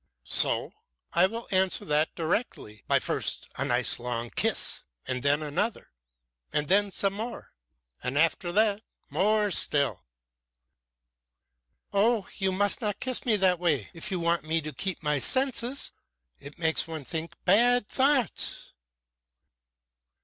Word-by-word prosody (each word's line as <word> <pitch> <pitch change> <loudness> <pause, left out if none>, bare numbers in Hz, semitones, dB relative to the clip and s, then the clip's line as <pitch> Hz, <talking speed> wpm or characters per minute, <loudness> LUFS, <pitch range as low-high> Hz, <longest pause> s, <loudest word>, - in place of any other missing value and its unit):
"So? - - +3 0.4
I 175 +2 +5
will 230 +3 -7
answer 190 -1 +2
that 150 +1 +1
directly. 160 - -3
But - - +2
first - - -1
a 130 - -1
nice 125 -3 +1
long 120 -1 -4
kiss, - - 0 0.3
and 125 -1 -2
then 145 +3 +1
another, 175 +10 -3 0.6
and 150 - 0
then 200 +3 +3
some 195 0 -1
more, 230 +4 -7 0.5
and 125 +3 -3
after 165 +3 +1
that 210 +1 +2 0.3
more 210 +1 +2
still." 140 -5 0 1.9
"Oh! 210 +1 +2
You 190 -2 0
must 200 +4 +2
not 210 -3 -2
kiss 255 0 -1
me 225 - +4
that 185 -3 +2
way 155 - 0
if 170 +5 -3
you 185 -3 -2
want 170 0 +1
me 160 +1 0
to 155 0 -6
keep 190 -4 -3
my 150 -1 +1
senses! 260 - +1 0.5
It 145 - -11
makes 160 -1 +1
one 160 -4 -7
think 165 +2 -5
bad 240 +4 +4
thoughts." 270 -2 +1
185 Hz, 135 wpm, -27 LUFS, 150-210 Hz, 1.9 s, I